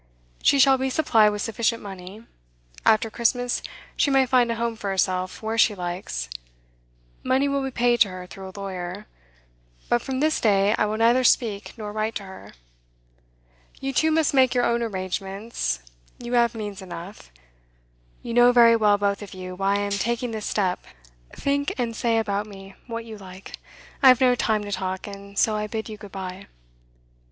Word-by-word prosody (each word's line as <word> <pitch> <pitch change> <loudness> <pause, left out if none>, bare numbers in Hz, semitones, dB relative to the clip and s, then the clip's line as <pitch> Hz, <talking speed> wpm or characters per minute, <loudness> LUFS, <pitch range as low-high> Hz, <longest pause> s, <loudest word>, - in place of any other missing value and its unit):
She 280 - +4
shall 270 -1 +5
be 265 0 0
supplied 225 -7 +4
with 210 0 -3
sufficient 230 0 0
money. 195 +2 -10 0.6
After 220 0 +4
Christmas 245 +2 0 0.3
she - - +2
may 270 -1 +4
find 250 -2 +3
a - - -1
home 230 0 -2
for 205 -2 -5
herself 185 0 -1
where 220 +1 -2
she 215 -1 +4
likes; 175 - -4 0.9
money 265 +2 +2
will 280 0 0
be 270 - -2
paid 240 -1 +2
to 205 - +5
her 185 0 -8
through 190 +1 -10
a 190 - -11
lawyer, 190 +1 -5 0.8
but 240 - +2
from 265 -1 -3
this 310 +2 +1
day 200 -1 +3
I 210 - +1
will 215 +1 -2
neither 235 +3 +4
speak 220 -5 +1
nor 210 -2 -6
write 215 +1 -2
to 205 - -4
her. 190 -1 -12 1.3
You 270 0 -3
two 315 +5 +3
must 315 -2 +2
make 260 -2 +4
your 245 - +3
own 235 0 +1
arrangements; 195 - -3 0.4
you 240 0 -6
have 235 -1 +3
means 205 -3 -6
enough. 180 - -9 0.9
You 235 - -5
know 245 +1 +6
very 235 -1 +7
well, 210 -2 +4
both 200 0 0
of 200 -2 -9
you, 185 0 -7
why 195 +2 0
I - - +1
am 205 0 -2
taking 235 +4 -1
this 220 -2 -4
step; 185 -3 -1 0.5
think 285 0 -1
and 235 -3 -2
say 230 -1 +1
about 205 -2 -1
me 195 -1 -11
what 230 -1 -5
you 220 -2 -9
like. 190 0 -11 0.4
I 270 - +7
have 255 -1 +8
no 255 -2 +5
time 220 -3 0
to 205 - -6
talk, 190 -1 -3
and 200 0 -10
so 220 - +3
I 210 0 -2
bid 220 +1 -5
you 215 - -7
good 205 -2 -12
bye. 190 0 -7
215 Hz, 185 wpm, -24 LUFS, 195-240 Hz, 1.3 s, have